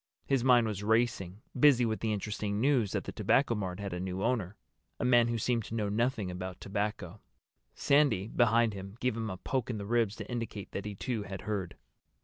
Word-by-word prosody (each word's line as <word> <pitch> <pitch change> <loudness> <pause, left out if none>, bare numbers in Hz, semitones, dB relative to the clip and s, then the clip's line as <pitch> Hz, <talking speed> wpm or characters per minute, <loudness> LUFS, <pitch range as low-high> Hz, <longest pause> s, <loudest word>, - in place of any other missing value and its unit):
His 135 -3 +1
mind 125 -2 +5
was 105 -3 -3
racing, 105 -3 0
busy 130 -2 +5
with 110 -1 -1
the 110 - -1
interesting 105 0 -2
news 125 -5 +2
that - - -1
the - - -6
Tobacco 135 -3 +2
Mart 95 -4 -3
had 100 -2 -4
a 90 - -3
new 95 +1 -3
owner—a 110 -4 -4
man 120 -2 +5
who 120 0 -1
seemed 115 +1 0
to 115 - -6
know 105 -2 -1
nothing 110 -3 0
about 90 0 -6
tobacco. 100 -1 -3 0.5
Sandy, 140 -9 +3
behind 115 -1 +3
him, 100 +2 -8
gave 125 -2 0
him 115 -1 -3
a 95 - -5
poke 130 +6 -2
in 115 - -2
the 100 - -5
ribs 115 -1 +1
to - - -7
indicate 115 -5 -5
that 100 - -5
he 105 -1 -5
too 115 +2 -3
had 95 -2 -6
heard. 100 -5 -3
110 Hz, 205 wpm, -31 LUFS, 100-120 Hz, 0.5 s, mind